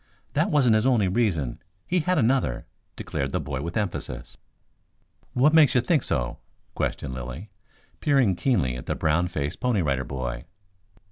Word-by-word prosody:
"That - - +2
wasn't 140 - +4
his 110 +3 +3
only 115 -7 +3
reason. 90 - 0 0.3
He 180 - +1
had 180 +2 +1
another," 125 - +1 0.3
declared 70 0 -3
the - - 0
boy 70 -3 -4
with 85 +7 -4
emphasis. 105 -4 -4 1.0
"What 140 +5 +4
makes 155 -5 +6
you 125 - +5
think 155 +1 +2
so?" - - -2 0.3
questioned 65 -3 -2
Lilly, 65 - -7 0.5
peering 135 -10 +3
keenly 90 - +1
at 60 - -9
the - - -1
brown 80 +3 +1
faced 75 -4 -3
Pony 120 -7 +1
Rider 70 -3 0
Boy. 60 -2 -5
95 Hz, 155 wpm, -25 LUFS, -, 1.0 s, makes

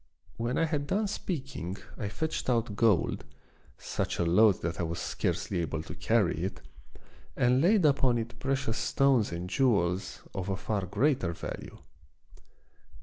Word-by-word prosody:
When 120 +2 -1
I 165 - +3
had 150 -3 -2
done 210 +6 +1
speaking 135 - -4 0.2
I 105 - -4
fetched 160 +5 -3
out 115 -4 +1
gold, 105 -5 +2 0.5
such - - -3
a 85 - +1
load 100 +3 +4
that 85 0 -2
I - - +1
was 85 0 -2
scarcely 95 - -2
able 80 -1 -3
to - - -8
carry - - +1
it, - - -3 0.8
and 125 +2 +3
laid 190 +1 +4
upon 135 -4 +3
it 115 +1 -5
precious 135 -3 -1
stones 135 -8 +2
and 85 +1 -4
jewels 95 -5 +1
of 95 -1 -3
a 95 - -1
far 100 0 -2
greater 105 - +1
value. 85 - -7
115 Hz, 150 wpm, -29 LUFS, 90-135 Hz, 0.8 s, load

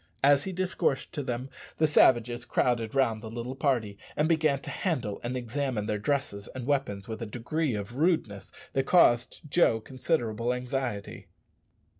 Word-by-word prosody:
As 140 0 +5
he 190 - -3
discoursed 185 -7 -1
to 150 - -2
them 125 0 -4 0.3
the 155 - +4
savages 120 -5 +4
crowded 120 -1 0
round 115 -5 +2
the 110 - -7
little 120 +3 -5
party, 125 -8 0 0.2
and 150 - +2
began 155 -4 +2
to - - -6
handle 130 - -2
and 125 +2 -2
examine 125 -2 -2
their 105 -1 -1
dresses 105 -4 -2
and 130 -2 -5
weapons 130 -9 -1
with 110 0 -6
a 115 - -3
degree 125 +5 -2
of 100 +2 -5
rudeness 130 - 0 0.2
that 135 0 0
caused 120 -9 +4
Joe 140 -7 +3
considerable 120 -2 -1
anxiety. 125 -4 -4
125 Hz, 160 wpm, -28 LUFS, 115-145 Hz, 0.3 s, As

